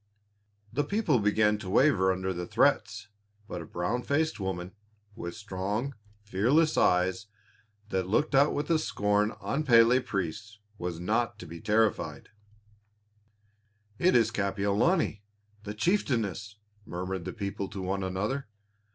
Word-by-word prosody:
The 145 Hz, +4 st, +1 dB
people 165 Hz, -, +1 dB
began 105 Hz, 0 st, +2 dB
to 100 Hz, -3 st, -7 dB
waver 95 Hz, -5 st, +4 dB
under 95 Hz, 0 st, -2 dB
the 90 Hz, 0 st, -5 dB
threats, 110 Hz, -3 st, +1 dB, 0.4 s
but 90 Hz, -5 st, -5 dB
a 85 Hz, -, -9 dB
brown 90 Hz, +8 st, -2 dB
faced 155 Hz, +4 st, 0 dB
woman, 95 Hz, -2 st, -4 dB, 0.4 s
with 85 Hz, -4 st, -6 dB
strong, 105 Hz, +5 st, -3 dB, 0.3 s
fearless 125 Hz, -, +2 dB
eyes 90 Hz, +3 st, +2 dB, 0.6 s
that 95 Hz, -4 st, -1 dB
looked 145 Hz, +10 st, +1 dB
out 140 Hz, +2 st, +5 dB
with 150 Hz, +3 st, 0 dB
scorn 105 Hz, -5 st, +1 dB
on 155 Hz, +3 st, -2 dB
Pélé 120 Hz, -1 st, +5 dB
priests, 105 Hz, -1 st, -4 dB, 0.2 s
was 85 Hz, -1 st, -4 dB
not 110 Hz, +6 st, 0 dB
to -, -, -9 dB
be 85 Hz, +1 st, -9 dB
terrified. 105 Hz, -9 st, 0 dB, 1.7 s
"It 185 Hz, -, +4 dB
is 115 Hz, -2 st, +4 dB
Kapiolani, 105 Hz, -, +1 dB, 0.4 s
the 105 Hz, 0 st, -5 dB
chieftainess," 105 Hz, -, 0 dB, 0.3 s
murmured 90 Hz, -1 st, -4 dB
the 90 Hz, -, -3 dB
people 100 Hz, -1 st, -4 dB
to 95 Hz, -2 st, -6 dB
one 95 Hz, +1 st, -2 dB
another. 105 Hz, +8 st, -2 dB
105 Hz, 130 wpm, -29 LUFS, 95-125 Hz, 1.7 s, out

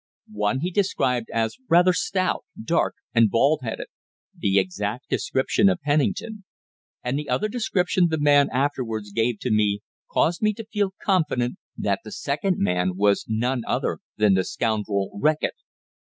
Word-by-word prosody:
One 105 Hz, +5 st, 0 dB
he 180 Hz, +3 st, -1 dB
described 130 Hz, -, 0 dB
as 115 Hz, -, -1 dB
rather 180 Hz, +2 st, +5 dB
stout, 185 Hz, +1 st, 0 dB, 0.2 s
dark, 165 Hz, +10 st, 0 dB, 0.2 s
and 115 Hz, -2 st, +5 dB
bald 140 Hz, +8 st, +3 dB
headed 115 Hz, -3 st, -4 dB, 0.5 s
the 100 Hz, 0 st, +1 dB
exact 100 Hz, +5 st, -2 dB
description 135 Hz, +9 st, +2 dB
of 185 Hz, -1 st, 0 dB
Pennington 195 Hz, +9 st, 0 dB, 0.6 s
and 125 Hz, +3 st, -1 dB
the 150 Hz, -, -6 dB
other 160 Hz, +12 st, +1 dB
description 190 Hz, -6 st, +1 dB
the 160 Hz, -, 0 dB
man 145 Hz, -1 st, +5 dB
afterwards 125 Hz, -6 st, -2 dB
gave 115 Hz, +2 st, 0 dB
to -, -, -1 dB
me 105 Hz, -1 st, +2 dB, 0.3 s
caused 170 Hz, +1 st, +1 dB
me 215 Hz, 0 st, +3 dB
to 225 Hz, +2 st, -8 dB
feel 205 Hz, -3 st, -1 dB
confident 155 Hz, -, +1 dB, 0.2 s
that -, -, 0 dB
the -, -, -9 dB
second 175 Hz, +6 st, -1 dB
man 90 Hz, -1 st, +1 dB
was 100 Hz, 0 st, +2 dB
none 120 Hz, +3 st, 0 dB
other -, -, -1 dB, 0.2 s
than 105 Hz, -2 st, +4 dB
the 95 Hz, 0 st, +2 dB
scoundrel 105 Hz, -3 st, -1 dB
Reckitt. 155 Hz, 0 st, +2 dB
130 Hz, 150 wpm, -24 LUFS, 110-180 Hz, 0.6 s, rather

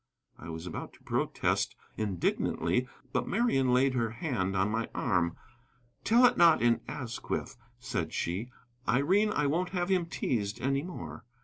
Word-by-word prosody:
I 80 Hz, -, -9 dB
was 80 Hz, +1 st, -6 dB
about -, -, -6 dB
to -, -, -21 dB
protest -, -, 0 dB, 0.2 s
indignantly, 110 Hz, +5 st, 0 dB, 0.3 s
but 125 Hz, -1 st, 0 dB
Marian 175 Hz, -, +2 dB
laid 130 Hz, +2 st, +4 dB
her 115 Hz, -3 st, +1 dB
hand 110 Hz, -, -2 dB
on 95 Hz, +2 st, +2 dB
my 115 Hz, +1 st, -1 dB
arm. 85 Hz, -6 st, +1 dB, 0.7 s
"Tell 235 Hz, +3 st, +6 dB
it -, -, +4 dB
not 170 Hz, -2 st, +7 dB
in 120 Hz, -1 st, +3 dB
Asquith," 130 Hz, -2 st, -4 dB, 0.2 s
said 120 Hz, -11 st, -3 dB
she. 95 Hz, +8 st, -2 dB, 0.4 s
"Irene, 190 Hz, +11 st, +3 dB
I 150 Hz, -8 st, +1 dB
won't 170 Hz, +6 st, +1 dB
have 175 Hz, +1 st, 0 dB
him 180 Hz, -3 st, +2 dB
teased 110 Hz, -8 st, -2 dB
any 135 Hz, +3 st, +1 dB
more." 85 Hz, -, -7 dB
125 Hz, 150 wpm, -30 LUFS, 100-160 Hz, 0.7 s, not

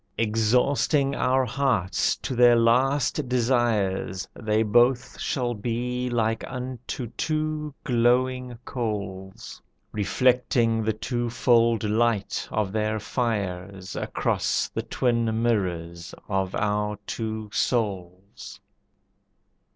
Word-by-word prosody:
Exhausting 125 Hz, +6 st, +2 dB
our 130 Hz, -1 st, +2 dB
hearts 115 Hz, -7 st, +1 dB
to 130 Hz, -, -5 dB
their 120 Hz, 0 st, +6 dB
last 130 Hz, +4 st, +2 dB
desires, 115 Hz, -7 st, 0 dB
They 110 Hz, 0 st, 0 dB
both 120 Hz, +3 st, +2 dB
shall 125 Hz, -2 st, -1 dB
be 125 Hz, +3 st, -2 dB
like 115 Hz, -2 st, 0 dB
unto 125 Hz, 0 st, -5 dB
two 155 Hz, -1 st, -2 dB
glowing 125 Hz, -1 st, +1 dB
coals, 100 Hz, -5 st, -5 dB, 0.3 s
Reflecting 115 Hz, +2 st, +2 dB
the 110 Hz, -, +1 dB
twofold 115 Hz, 0 st, +1 dB
light 110 Hz, -1 st, 0 dB
of 105 Hz, -3 st, -1 dB
their 110 Hz, +1 st, -1 dB
fires 100 Hz, -5 st, -3 dB
Across -, -, -1 dB
the -, -, -3 dB
twin 115 Hz, -2 st, 0 dB
mirrors 85 Hz, -6 st, -2 dB
of 95 Hz, -2 st, -1 dB
our 105 Hz, 0 st, -1 dB
two 110 Hz, -2 st, -4 dB
souls. 95 Hz, -5 st, -3 dB
115 Hz, 95 wpm, -25 LUFS, 105-125 Hz, 0.3 s, their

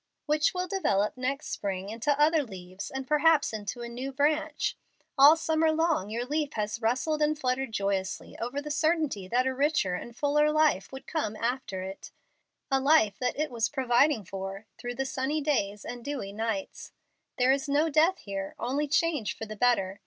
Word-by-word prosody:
"Which 305 Hz, +4 st, +2 dB
will 365 Hz, 0 st, -1 dB
develop 210 Hz, -, 0 dB
next 260 Hz, +3 st, -3 dB
spring 195 Hz, -1 st, -3 dB
into 260 Hz, +7 st, 0 dB
other 310 Hz, +1 st, +4 dB
leaves 185 Hz, -5 st, -8 dB
and 265 Hz, 0 st, -5 dB
perhaps 300 Hz, -1 st, +3 dB
into 215 Hz, +3 st, -5 dB
a -, -, -5 dB
new 250 Hz, +3 st, -5 dB
branch. 300 Hz, +2 st, 0 dB, 0.4 s
All 290 Hz, +2 st, +8 dB
summer 320 Hz, 0 st, +1 dB
long 315 Hz, -, +1 dB
your 235 Hz, +3 st, -2 dB
leaf 295 Hz, +2 st, -1 dB
has 215 Hz, +1 st, -3 dB
rustled 265 Hz, +7 st, 0 dB
and 300 Hz, 0 st, +2 dB
fluttered 255 Hz, -2 st, -1 dB
joyously 195 Hz, -2 st, -2 dB
over 260 Hz, +5 st, -3 dB
the 300 Hz, -, -5 dB
certainty 305 Hz, -, 0 dB
that 245 Hz, +5 st, +1 dB
a 260 Hz, -, 0 dB
richer 285 Hz, -, +1 dB
and 230 Hz, +6 st, -6 dB
fuller 295 Hz, +2 st, +2 dB
life 305 Hz, -10 st, +2 dB
would 265 Hz, 0 st, -9 dB
come 220 Hz, -10 st, -2 dB
after 230 Hz, -5 st, -2 dB
it, 190 Hz, +1 st, -8 dB, 0.6 s
a 270 Hz, -, +4 dB
life 270 Hz, -7 st, +3 dB
that 250 Hz, +1 st, -1 dB
it 305 Hz, -1 st, -1 dB
was 230 Hz, -2 st, 0 dB
providing 260 Hz, -3 st, +2 dB
for 195 Hz, +2 st, -6 dB
through 245 Hz, 0 st, -5 dB
the 270 Hz, -, -2 dB
sunny 265 Hz, +3 st, -1 dB
days 210 Hz, -9 st, -1 dB
and 245 Hz, -1 st, -7 dB
dewy 265 Hz, -8 st, -4 dB
nights. 220 Hz, -2 st, -4 dB, 0.4 s
There 250 Hz, +1 st, +4 dB
is 275 Hz, +2 st, 0 dB
no 295 Hz, +3 st, +3 dB
death 320 Hz, +5 st, +3 dB
here, 195 Hz, -1 st, -5 dB
only 280 Hz, +5 st, -1 dB
change 300 Hz, -6 st, 0 dB
for 225 Hz, -, -5 dB
the 215 Hz, 0 st, -7 dB
better. 200 Hz, -4 st, +1 dB
265 Hz, 180 wpm, -28 LUFS, 215-300 Hz, 0.6 s, All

